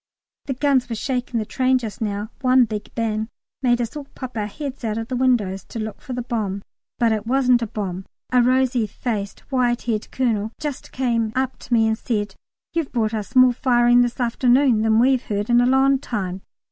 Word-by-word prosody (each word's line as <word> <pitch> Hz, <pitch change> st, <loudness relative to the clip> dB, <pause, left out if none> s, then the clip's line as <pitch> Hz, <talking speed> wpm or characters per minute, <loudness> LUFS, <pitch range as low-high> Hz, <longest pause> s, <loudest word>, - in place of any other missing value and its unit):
The 270 Hz, -, -3 dB
guns 265 Hz, -2 st, +2 dB
were 230 Hz, -, -2 dB
shaking 250 Hz, +1 st, -2 dB
the 215 Hz, -, -2 dB
train 255 Hz, +3 st, +2 dB
just 225 Hz, -5 st, -6 dB
now; 210 Hz, 0 st, -3 dB
one 255 Hz, -1 st, +5 dB
big 215 Hz, -2 st, -5 dB
bang 220 Hz, -1 st, -1 dB, 0.3 s
made 245 Hz, -2 st, +2 dB
us 235 Hz, +1 st, -3 dB
all 295 Hz, -2 st, -6 dB
pop 255 Hz, -2 st, -7 dB
our 210 Hz, -2 st, -1 dB
heads 275 Hz, +3 st, -7 dB
out 220 Hz, -1 st, -1 dB
of 225 Hz, 0 st, -4 dB
the 255 Hz, -, -2 dB
window 240 Hz, -7 st, +2 dB
to 195 Hz, +4 st, -8 dB
look 215 Hz, -1 st, -5 dB
for 255 Hz, -, -7 dB
the 245 Hz, 0 st, -3 dB
bomb, 205 Hz, -5 st, -3 dB, 0.3 s
but 235 Hz, -1 st, +3 dB
it 215 Hz, 0 st, -2 dB
wasn't 250 Hz, -1 st, +3 dB
a 230 Hz, -, -1 dB
bomb. 190 Hz, -3 st, -4 dB, 0.3 s
A 250 Hz, -1 st, +5 dB
rosy 255 Hz, -2 st, +2 dB
faced 205 Hz, -1 st, -4 dB
white 245 Hz, -2 st, +1 dB
haired 220 Hz, -3 st, -2 dB
Colonel 230 Hz, -5 st, 0 dB
here -, -, -43 dB
just 295 Hz, -3 st, -5 dB
came 235 Hz, -4 st, 0 dB
up 260 Hz, 0 st, -1 dB
to 250 Hz, -, -5 dB
me 225 Hz, -1 st, +4 dB
and 220 Hz, +1 st, 0 dB
said, 205 Hz, -4 st, -2 dB, 0.4 s
"You've 330 Hz, -4 st, -1 dB
brought 225 Hz, -2 st, 0 dB
us 215 Hz, 0 st, -5 dB
more 255 Hz, -1 st, +7 dB
firing 240 Hz, -1 st, +4 dB
this 245 Hz, +1 st, -1 dB
afternoon 245 Hz, 0 st, +3 dB
than 220 Hz, 0 st, +3 dB
we've 255 Hz, +2 st, +4 dB
heard 205 Hz, -1 st, -2 dB
for 240 Hz, -, -1 dB
a 245 Hz, +1 st, +5 dB
long 265 Hz, +1 st, +4 dB
time." 195 Hz, -8 st, -4 dB
240 Hz, 210 wpm, -22 LUFS, 215-255 Hz, 0.4 s, more